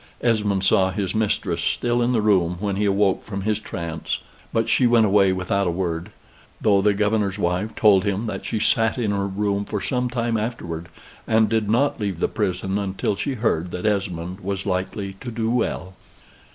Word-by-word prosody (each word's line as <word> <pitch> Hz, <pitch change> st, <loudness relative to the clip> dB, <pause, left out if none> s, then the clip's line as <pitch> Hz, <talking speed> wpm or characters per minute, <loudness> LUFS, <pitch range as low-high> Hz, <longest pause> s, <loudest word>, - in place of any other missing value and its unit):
Esmond 105 Hz, -5 st, +1 dB
saw 95 Hz, 0 st, +4 dB
his 95 Hz, -1 st, -2 dB
mistress 110 Hz, -1 st, 0 dB
still 120 Hz, 0 st, 0 dB
in 120 Hz, +1 st, +2 dB
the 115 Hz, -4 st, +1 dB
room 90 Hz, -5 st, +2 dB
when 100 Hz, -1 st, -1 dB
he 105 Hz, +1 st, 0 dB
awoke 100 Hz, -1 st, +2 dB
from 100 Hz, -2 st, -5 dB
his 105 Hz, 0 st, 0 dB
trance; 85 Hz, -6 st, -4 dB, 0.3 s
but 115 Hz, 0 st, +1 dB
she 125 Hz, +2 st, +3 dB
went 115 Hz, -2 st, +5 dB
away 100 Hz, -2 st, +4 dB
without 95 Hz, +1 st, 0 dB
a -, -, +2 dB
word; 85 Hz, -1 st, -2 dB, 0.5 s
though 100 Hz, -2 st, +3 dB
the 105 Hz, 0 st, +3 dB
governor's 105 Hz, -1 st, +1 dB
wife 90 Hz, +3 st, -1 dB
told 100 Hz, -4 st, +5 dB
him 100 Hz, +2 st, -1 dB
that 110 Hz, -, -4 dB
she 110 Hz, -, -2 dB
sat 110 Hz, +1 st, +2 dB
in 110 Hz, -4 st, 0 dB
her 100 Hz, -1 st, 0 dB
room 100 Hz, +1 st, -1 dB
for 105 Hz, 0 st, -3 dB
some 125 Hz, +3 st, -1 dB
time 120 Hz, -2 st, -1 dB
afterward, 85 Hz, -7 st, -4 dB, 0.4 s
and 110 Hz, -1 st, +3 dB
did 110 Hz, -2 st, 0 dB
not 125 Hz, +5 st, +2 dB
leave 100 Hz, -5 st, -2 dB
the -, -, +2 dB
prison 95 Hz, -1 st, -1 dB
until 100 Hz, 0 st, -1 dB
she 135 Hz, +7 st, -2 dB
heard 90 Hz, -7 st, 0 dB
that 90 Hz, +2 st, -5 dB
Esmond 95 Hz, -3 st, -1 dB
was 100 Hz, 0 st, -4 dB
likely 95 Hz, +1 st, -2 dB
to 125 Hz, -, -5 dB
do 115 Hz, -1 st, -1 dB
well. 105 Hz, -6 st, -1 dB
100 Hz, 190 wpm, -23 LUFS, 95-110 Hz, 0.5 s, went